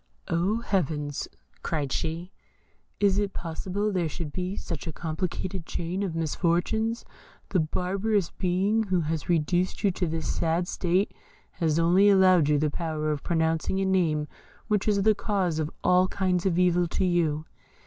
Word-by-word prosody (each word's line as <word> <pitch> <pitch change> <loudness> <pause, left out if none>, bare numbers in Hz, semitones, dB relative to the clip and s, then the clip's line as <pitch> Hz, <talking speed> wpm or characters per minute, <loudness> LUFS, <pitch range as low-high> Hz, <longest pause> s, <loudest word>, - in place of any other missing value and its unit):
"Oh, 190 +7 +1
Heavens!" 150 - -1 0.3
cried 145 -5 -2
she, 165 +5 -3 0.7
"is 200 -1 +3
it 205 -1 -1
possible 190 +5 -3
there 175 -4 0
should 155 -3 -6
be 185 +1 -3
such 165 -5 -5
a - - -2
complicated 170 +2 -4
chain 175 +3 -3
of 185 -5 -2
misfortunes. 175 +8 0 0.4
The 185 - +2
barbarous 190 +4 0
being 195 +5 +1
who 190 -5 +1
has 160 0 -3
reduced 175 +2 +1
you 200 - +4
to 180 0 -2
this 160 -1 -3
sad 170 +2 0
state 185 +4 0 0.4
has 160 -3 0
only 180 +5 +5
allowed 185 -6 +5
you 150 - +4
the 150 0 +1
power 155 -2 -2
of 150 -2 -2
pronouncing 160 +2 0
a 195 - +1
name 165 -6 +1 0.4
which 210 -2 0
is 200 -2 +2
the 215 +1 +5
cause 190 -6 -1
of 155 -1 -1
all 180 +1 +4
kinds 185 -1 0
of 175 -2 +1
evil 180 -1 +3
to 190 - -1
you. 160 -4 +1
175 Hz, 160 wpm, -27 LUFS, 160-190 Hz, 0.7 s, only